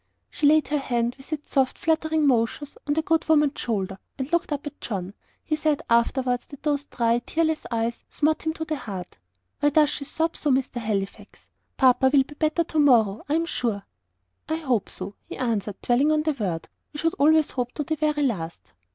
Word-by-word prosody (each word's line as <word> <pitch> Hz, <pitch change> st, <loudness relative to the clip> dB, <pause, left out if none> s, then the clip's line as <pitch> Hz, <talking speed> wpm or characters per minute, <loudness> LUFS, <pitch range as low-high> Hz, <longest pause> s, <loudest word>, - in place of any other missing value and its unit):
She 290 Hz, -, +2 dB
laid 310 Hz, +1 st, +4 dB
her 295 Hz, 0 st, +1 dB
hand, 240 Hz, -3 st, 0 dB
with 270 Hz, -, -15 dB
its 300 Hz, -1 st, -5 dB
soft, 265 Hz, -2 st, +2 dB
fluttering 315 Hz, -1 st, +1 dB
motions, 265 Hz, +3 st, +1 dB
on 290 Hz, -, +1 dB
the 320 Hz, -, +1 dB
good 325 Hz, 0 st, +1 dB
woman's 300 Hz, -2 st, +3 dB
shoulder, 195 Hz, -4 st, -2 dB, 0.2 s
and 265 Hz, +2 st, -4 dB
looked 340 Hz, -2 st, +1 dB
up 290 Hz, 0 st, -2 dB
at 290 Hz, -, -8 dB
John. 195 Hz, -3 st, -4 dB, 0.3 s
He 310 Hz, -, 0 dB
said 305 Hz, -1 st, 0 dB
afterwards 245 Hz, +1 st, +2 dB
that 280 Hz, -, -12 dB
those 290 Hz, -2 st, 0 dB
dry, 235 Hz, -3 st, +1 dB
tearless 315 Hz, +4 st, -1 dB
eyes 230 Hz, 0 st, -2 dB
smote 310 Hz, +1 st, 0 dB
him 315 Hz, -, +1 dB
to 320 Hz, 0 st, -5 dB
the 310 Hz, -1 st, -2 dB
heart. 185 Hz, -, -7 dB, 0.4 s
"Why 290 Hz, -, +4 dB
does 300 Hz, 0 st, +4 dB
she 280 Hz, -, -4 dB
sob 325 Hz, +3 st, -1 dB
so, 300 Hz, -, -1 dB
Mr 260 Hz, -2 st, +1 dB
Halifax? 200 Hz, -3 st, -4 dB, 0.3 s
Papa 260 Hz, 0 st, +5 dB
will 275 Hz, -2 st, +5 dB
be 290 Hz, -, -13 dB
better 310 Hz, +3 st, +1 dB
tomorrow, 245 Hz, -11 st, +3 dB
I 300 Hz, -, +2 dB
am 330 Hz, +1 st, +1 dB
sure." 225 Hz, -10 st, -2 dB, 0.6 s
"I 315 Hz, -, +1 dB
HOPE 260 Hz, -10 st, 0 dB
so," 190 Hz, +2 st, -6 dB
he -, -, -7 dB
answered, 215 Hz, -5 st, -2 dB
dwelling 265 Hz, +5 st, +3 dB
on 305 Hz, 0 st, +2 dB
the 310 Hz, -1 st, +1 dB
word; 190 Hz, -, -3 dB, 0.3 s
"we -, -, -7 dB
should 330 Hz, +2 st, +1 dB
always 310 Hz, +1 st, +4 dB
hope 245 Hz, -2 st, -2 dB
to 300 Hz, -, -2 dB
the 315 Hz, +2 st, -1 dB
very 300 Hz, -1 st, 0 dB
last." 170 Hz, -, -3 dB
280 Hz, 205 wpm, -25 LUFS, 235-310 Hz, 0.6 s, Papa